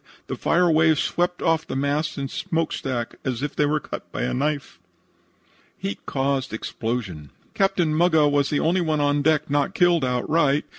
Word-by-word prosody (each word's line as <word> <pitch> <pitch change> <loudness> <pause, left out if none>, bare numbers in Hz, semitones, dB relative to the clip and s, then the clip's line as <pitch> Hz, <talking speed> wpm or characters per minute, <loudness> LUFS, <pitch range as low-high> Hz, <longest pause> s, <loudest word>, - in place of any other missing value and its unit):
The - - -4
fire 180 +1 +2
wave 160 0 +4
swept 175 0 -1
off 165 -1 +1
the - - -4
masts 145 +3 -1
and 135 -1 -4
smokestack 160 -8 -3
as 130 -1 -3
if 145 - -3
they 145 - +2
were 155 +1 +1
cut - - -7
with - - -3
a 60 - -1
knife. 145 - -2 1.0
HEAT 100 0 -6
CAUSED 135 -1 -1
EXPLOSIONS 110 - -4 0.2
"Captain 195 -5 +1
Muggah 160 -2 +4
was 145 -1 +2
the 145 - +1
only 175 +3 +2
one 155 -3 0
on 145 0 +2
deck 155 0 +2
not 145 +6 0
killed 175 -6 +3
outright. 140 +3 +1
145 Hz, 170 wpm, -23 LUFS, 135-160 Hz, 1.0 s, wave